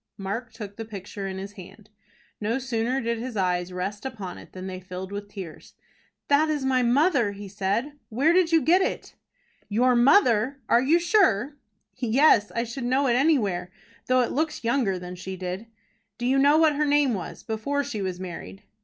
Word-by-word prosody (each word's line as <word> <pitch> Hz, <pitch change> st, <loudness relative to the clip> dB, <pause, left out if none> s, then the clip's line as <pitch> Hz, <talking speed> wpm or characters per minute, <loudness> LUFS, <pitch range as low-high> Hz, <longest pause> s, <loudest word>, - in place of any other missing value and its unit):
Mark 215 Hz, +5 st, -4 dB
took 205 Hz, -3 st, -9 dB
the 225 Hz, -, -4 dB
picture 200 Hz, -2 st, -7 dB
in 190 Hz, 0 st, -5 dB
his 195 Hz, +1 st, -6 dB
hand. 205 Hz, +2 st, -14 dB, 0.5 s
No 220 Hz, +4 st, -1 dB
sooner 250 Hz, 0 st, -1 dB
did 235 Hz, 0 st, -2 dB
his 240 Hz, -1 st, -5 dB
eyes 180 Hz, -1 st, 0 dB
rest 190 Hz, +3 st, -4 dB
upon 220 Hz, -9 st, -6 dB
it -, -, -14 dB
than 185 Hz, 0 st, -8 dB
they 185 Hz, -1 st, -5 dB
filled 185 Hz, +1 st, -7 dB
with 205 Hz, 0 st, -6 dB
tears. 190 Hz, -6 st, -10 dB, 0.5 s
"That 295 Hz, +2 st, +3 dB
is 295 Hz, -3 st, -1 dB
my 260 Hz, -1 st, +2 dB
mother" 250 Hz, -, +3 dB
he 200 Hz, 0 st, -9 dB
said. 210 Hz, +9 st, -2 dB
"Where 275 Hz, +9 st, +3 dB
did 355 Hz, -2 st, +3 dB
you 325 Hz, -2 st, +4 dB
get 360 Hz, +4 st, +4 dB
it?" -, -, -3 dB, 0.6 s
"Your 245 Hz, +4 st, +3 dB
mother! 245 Hz, -, +4 dB
Are 235 Hz, -, +4 dB
you 295 Hz, +6 st, +4 dB
sure?" 335 Hz, -, +2 dB, 0.4 s
"Yes; 245 Hz, -2 st, +4 dB
I 235 Hz, -, +1 dB
should 240 Hz, +2 st, -5 dB
know 260 Hz, +3 st, +2 dB
it 245 Hz, -, +3 dB
anywhere, 215 Hz, -, +1 dB, 0.4 s
though 255 Hz, 0 st, +4 dB
it 240 Hz, -, -1 dB
looks 310 Hz, -1 st, -2 dB
younger 230 Hz, -5 st, +1 dB
than 180 Hz, 0 st, -7 dB
she 185 Hz, +1 st, -7 dB
did." 185 Hz, +4 st, -5 dB, 0.5 s
"Do 240 Hz, -, -4 dB
you 265 Hz, +2 st, +3 dB
know 285 Hz, +2 st, +5 dB
what 315 Hz, -2 st, +4 dB
her 300 Hz, -, +2 dB
name 285 Hz, -3 st, +3 dB
was, 185 Hz, -5 st, -6 dB
before 280 Hz, +6 st, -2 dB
she 250 Hz, -7 st, -4 dB
was 185 Hz, -2 st, -3 dB
married?" 185 Hz, +2 st, -8 dB
230 Hz, 190 wpm, -25 LUFS, 195-275 Hz, 0.6 s, know